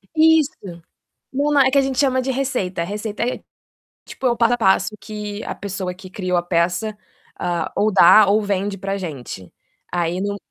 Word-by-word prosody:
Isso! 305 - +2 0.5
Não, 290 +2 +1
é 265 0 +5
que 280 - +3
a - - +7
gente 265 -1 -2
chama 260 -2 +3
de 265 +1 -2
receita. 250 -10 -2
Receita 210 +3 -5
é 250 - -3 0.6
tipo, 265 - -5
é - - +4
o 235 - 0
passo 235 +1 +3
a - - 0
passo 195 0 +2
que 210 -1 -6
a - - -4
pessoa 190 -2 -5
que 185 0 -12
criou 185 -2 -2
a 175 - +1
peça, 175 +5 0 0.4
hã, 175 -2 -1
ou 210 +1 +2
dá 200 +2 +7
ou 210 +2 +3
vende 200 0 -2
para 195 +1 -3
gente. 130 - -7 0.4
Aí 175 +1 -1
no 200 0 -2
205 Hz, 190 wpm, -20 LUFS, 180-245 Hz, 0.6 s, a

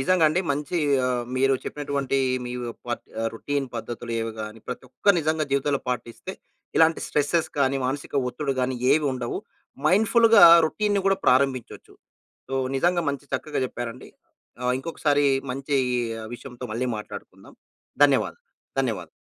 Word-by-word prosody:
నిజంగా 175 +4 +3
అండి. 165 +4 +1
మంచి 145 +5 -3 0.3
ఆహ్, 125 -1 -1
మీరు 135 +1 +3
చెప్పినటువంటి 140 -2 -2 0.3
మీ 125 - -5 0.3
ప - - -10 0.3
ఆహ్, 115 - 0
రొటీన్ 140 +3 -2
పద్ధతులు 115 0 -5
ఏవి 115 0 -3
గాని, 110 +1 -7
ప్రతి 125 +1 -6
ఒక్కరు 200 +9 +2
నిజంగా 155 0 0
జీవితంలో 140 0 +1
పాటిస్తే 125 +8 -4 0.5
ఇలాంటి 160 0 +4
స్ట్రెస్సెస్ 150 +3 +1
గాని, 135 0 +2
మానసిక 140 +3 -4 0.2
ఒత్తిడి 140 0 -2
గాని 130 +1 0 0.2
ఏవి 150 0 +2
ఉండవు. 125 -2 -3 0.5
మైండ్‌ఫుల్‌గా 220 +5 +5 0.2
రొటీన్‌ని 205 +3 0
గూడా 195 0 +3
ప్రారంభించొచ్చు. 130 -2 +1 0.5
సో, 135 - -3 0.2
నిజంగా 175 +5 +2
మంచి 140 0 -6
చక్కగా 145 +2 -2
జెప్పారండి. 120 0 -7 0.5
ఆహ్, 125 0 +1
ఇంకొకసారి 145 -2 +1 0.3
మంచి 140 +2 -2 0.5
ఆహ్, 110 - -8
విషయంతో 125 0 -9
మళ్ళీ 125 +3 -1
మాట్లాడుకుందాం. 105 - -10 0.5
ధన్యవాదాలు. - - +1 0.4
ధన్యవాదాలు. 105 -11 -2
140 Hz, 135 wpm, -25 LUFS, 125-155 Hz, 0.5 s, మైండ్‌ఫుల్‌గా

